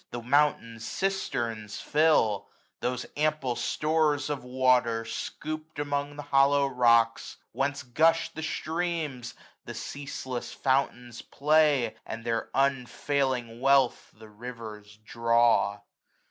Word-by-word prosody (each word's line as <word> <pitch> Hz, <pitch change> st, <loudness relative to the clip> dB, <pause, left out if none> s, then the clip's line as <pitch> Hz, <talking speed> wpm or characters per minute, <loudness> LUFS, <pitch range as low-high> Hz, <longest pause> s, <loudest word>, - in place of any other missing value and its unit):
The 120 Hz, -, -5 dB
mountain 125 Hz, -3 st, +1 dB
cisterns 115 Hz, -, -3 dB
fill, 150 Hz, -10 st, +2 dB, 0.3 s
those 125 Hz, 0 st, -2 dB
ample 150 Hz, -4 st, 0 dB
stores 150 Hz, -1 st, 0 dB
Of 140 Hz, -4 st, -4 dB
water, 125 Hz, -3 st, +2 dB
scoop'd 155 Hz, +7 st, -6 dB
among 145 Hz, 0 st, -2 dB
the 145 Hz, -, -7 dB
hollow 140 Hz, +1 st, +3 dB
rocks 115 Hz, -3 st, +2 dB
j -, -, -36 dB
Whence 140 Hz, +1 st, -2 dB
gush 160 Hz, +6 st, +2 dB
the 160 Hz, -, -8 dB
streams, 160 Hz, -4 st, -3 dB, 0.3 s
the -, -, -7 dB
ceaseless 135 Hz, -3 st, -6 dB
fountains 125 Hz, -3 st, -1 dB
play. 150 Hz, -5 st, +2 dB
And 115 Hz, +1 st, -7 dB
their 115 Hz, -1 st, -2 dB
unfailing 130 Hz, -2 st, 0 dB
wealth 135 Hz, -2 st, +3 dB
the 110 Hz, 0 st, -13 dB
rivers 105 Hz, -2 st, -9 dB
draw. 115 Hz, -3 st, +2 dB
130 Hz, 110 wpm, -28 LUFS, 115-145 Hz, 0.3 s, hollow